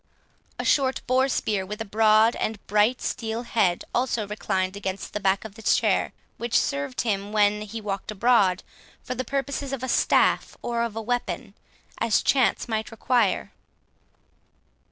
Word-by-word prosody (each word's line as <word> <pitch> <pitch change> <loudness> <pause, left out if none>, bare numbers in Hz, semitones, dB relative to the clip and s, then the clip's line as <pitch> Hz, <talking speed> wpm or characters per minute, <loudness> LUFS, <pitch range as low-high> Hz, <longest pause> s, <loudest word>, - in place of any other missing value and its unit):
A - - -4
short 265 -2 +2
boar 260 +1 +2
spear, 210 -6 0
with 210 +3 -7
a 225 - -3
broad 220 +2 +4
and 220 - -2
bright 215 +5 +2
steel 225 +1 -3
head, 205 -7 +1
also 240 -3 0
reclined 190 -2 -2
against 195 -1 -5
the 210 - -2
back 195 +1 +1
of 210 -2 -9
his 225 - +2
chair, - - +1 0.3
which 235 0 0
served 140 -2 -2
him, 205 -3 -2
when 210 0 +3
he 215 +2 -6
walked 200 -2 -4
abroad, 205 -4 +3 0.4
for 255 - -4
the 255 +1 -3
purposes 275 +1 -3
of 270 -2 -4
a - - -2
staff - - +2
or 235 -1 -1
of 230 -2 -2
a 225 - -3
weapon, 245 -2 -3 0.5
as 230 -2 +2
chance 260 -2 +2
might 220 -1 -2
require. 225 -3 0
220 Hz, 160 wpm, -25 LUFS, 200-240 Hz, 0.5 s, broad